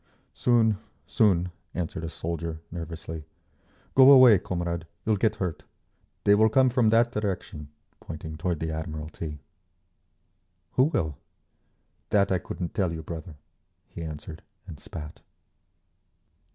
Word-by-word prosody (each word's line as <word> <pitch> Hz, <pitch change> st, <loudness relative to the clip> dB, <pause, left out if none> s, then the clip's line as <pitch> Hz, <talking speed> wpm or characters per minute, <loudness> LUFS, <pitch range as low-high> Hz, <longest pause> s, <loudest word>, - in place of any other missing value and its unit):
"Soon, 115 Hz, -4 st, +3 dB, 0.3 s
soon," 90 Hz, -7 st, +2 dB, 0.2 s
answered 85 Hz, -2 st, -3 dB
a 80 Hz, -, -3 dB
soldier, 85 Hz, -1 st, -4 dB
nervously. 80 Hz, -1 st, -6 dB, 0.7 s
"Go 130 Hz, 0 st, +8 dB
away, 130 Hz, -7 st, +9 dB
comrade, 85 Hz, -2 st, -3 dB, 0.2 s
you'll 110 Hz, -, +3 dB
get 110 Hz, +2 st, +1 dB
hurt. 90 Hz, -6 st, -3 dB, 0.6 s
They 100 Hz, -, +5 dB
will 110 Hz, +2 st, +5 dB
come 130 Hz, +3 st, +4 dB
from 120 Hz, -2 st, +3 dB
that 115 Hz, +2 st, +4 dB
direction," 100 Hz, -7 st, -3 dB, 0.3 s
pointing 80 Hz, 0 st, -7 dB
toward 85 Hz, +1 st, -2 dB
the 80 Hz, 0 st, -1 dB
Admiralty. 80 Hz, 0 st, -5 dB, 1.3 s
"Who 130 Hz, -, +4 dB
will?" 80 Hz, -, -1 dB, 0.9 s
"That 100 Hz, -2 st, +3 dB
I 95 Hz, -, +2 dB
couldn't 85 Hz, +1 st, -5 dB
tell 95 Hz, -4 st, 0 dB
you, 80 Hz, -1 st, -5 dB
brother," 80 Hz, 0 st, -7 dB, 0.5 s
he -, -, -8 dB
answered, 80 Hz, 0 st, -7 dB, 0.2 s
and 80 Hz, -7 st, -10 dB
spat. 80 Hz, -7 st, -9 dB
85 Hz, 125 wpm, -27 LUFS, 80-110 Hz, 1.3 s, away